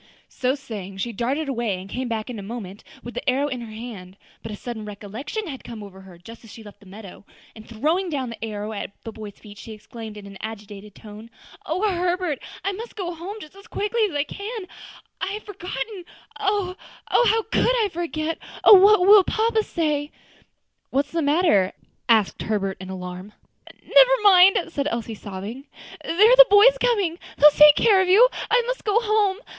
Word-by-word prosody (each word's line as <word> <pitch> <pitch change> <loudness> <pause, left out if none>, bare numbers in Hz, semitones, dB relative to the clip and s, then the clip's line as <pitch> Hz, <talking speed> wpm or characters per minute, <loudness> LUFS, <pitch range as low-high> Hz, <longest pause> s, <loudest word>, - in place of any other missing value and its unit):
So 255 +1 -1
saying, 210 -9 -8
she 235 +4 -4
darted 265 +8 -2
away, 235 -8 -2
and 185 - -10
came 250 +5 -4
back 225 -2 -3
in 230 - -7
a - - -6
moment 200 -2 -8 0.2
with 240 - -8
the - - -2
arrow 270 +3 +1
in 255 -4 -5
her 230 -2 -9
hand. 215 -5 -9 0.2
But 225 - -8
a - - -5
sudden 230 0 -7
recollection 210 - -6
had 275 -7 -8
come 225 -3 -9
over 190 -1 -12
her 190 -2 -15
just 225 +7 -14
as 225 - -15
she 225 - -12
left 205 -1 -14
the 200 - -18
meadow, 200 0 -12 0.3
and 220 0 -14
throwing 315 - -1
down 265 -6 -3
the 230 - -9
arrow 215 -1 -5
at 205 - -5
the 225 - -7
boy's 210 -2 -10
feet, 205 -2 -14
she 225 - -9
exclaimed 215 0 -10
in 205 - -10
an 195 -1 -12
agitated 210 -2 -9
tone, 215 +1 -12 0.4
"O 370 +7 0
Herbert! 355 -5 -1 0.3
I 395 - +1
must 445 +5 -8
go 360 -4 -4
home 350 +5 -7
just 310 +3 -13
as 395 +2 -15
quickly 445 +1 -1
as 315 - -9
I 290 - +1
can; 410 +5 -7 0.6
I 395 - -2
had 425 - -6
forgotten 370 -1 -7 0.3
oh! 400 -3 -1 0.3
how 450 -2 +3
could 445 - 0 0.2
I - - -2
forget! 325 -1 -3 0.2
oh! - - +9
what 400 +1 +7
will 400 +2 +7
papa 445 +3 0
say!" 300 -7 -2
"Why, - - -18 0.9
what's 285 +1 0
the 330 - -1
matter?" 285 - +2 0.4
asked 220 -4 +2
Herbert 195 -3 -2
in 190 - -8
alarm. 185 +2 -8 0.5
"Never - - +5
mind," 385 -1 +7
said 285 -2 -2
Elsie, 230 -2 -4
sobbing. 210 +6 -8 0.4
"There - - -4 0.2
are - - +7
the - - +11
boys 420 +5 +7
coming; 400 -9 0 0.2
they - - -7
will 300 - +10
take 300 0 +7
care 405 -4 +4
of 375 - 0
you, 420 +7 +7
and - - -6
I 480 0 +3
must - - -4
go 420 +1 +2
home. 425 -4 +1
275 Hz, 205 wpm, -23 LUFS, -, 0.9 s, the